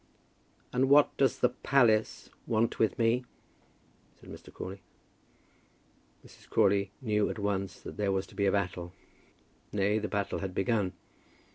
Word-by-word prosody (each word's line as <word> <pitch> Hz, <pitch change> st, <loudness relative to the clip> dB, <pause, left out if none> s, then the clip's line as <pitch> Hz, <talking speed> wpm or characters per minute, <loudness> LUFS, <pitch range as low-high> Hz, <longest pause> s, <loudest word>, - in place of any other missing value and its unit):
"And 130 Hz, +2 st, +2 dB
what 145 Hz, +1 st, +5 dB
does 135 Hz, -3 st, +2 dB
the 125 Hz, -, +3 dB
'palace' 120 Hz, -4 st, +1 dB, 0.2 s
want 115 Hz, 0 st, 0 dB
with 110 Hz, -, +2 dB
me?" 120 Hz, +1 st, +2 dB, 1.0 s
said -, -, -13 dB
Mr. -, -, -11 dB
Crawley. 95 Hz, +1 st, -7 dB, 1.4 s
Mrs. -, -, -18 dB
Crawley 100 Hz, 0 st, +3 dB
knew 105 Hz, -4 st, +1 dB
at -, -, -5 dB
once 100 Hz, -3 st, -2 dB
that -, -, -9 dB
there 100 Hz, -1 st, 0 dB
was 95 Hz, 0 st, -1 dB
to -, -, -17 dB
be 100 Hz, -1 st, +1 dB
a -, -, +3 dB
battle. 90 Hz, -3 st, -2 dB, 0.8 s
Nay, 105 Hz, +1 st, +1 dB
the 105 Hz, -, -3 dB
battle 100 Hz, -2 st, -2 dB
had 95 Hz, -2 st, -5 dB
begun. 100 Hz, -2 st, 0 dB
105 Hz, 145 wpm, -30 LUFS, 95-115 Hz, 1.4 s, what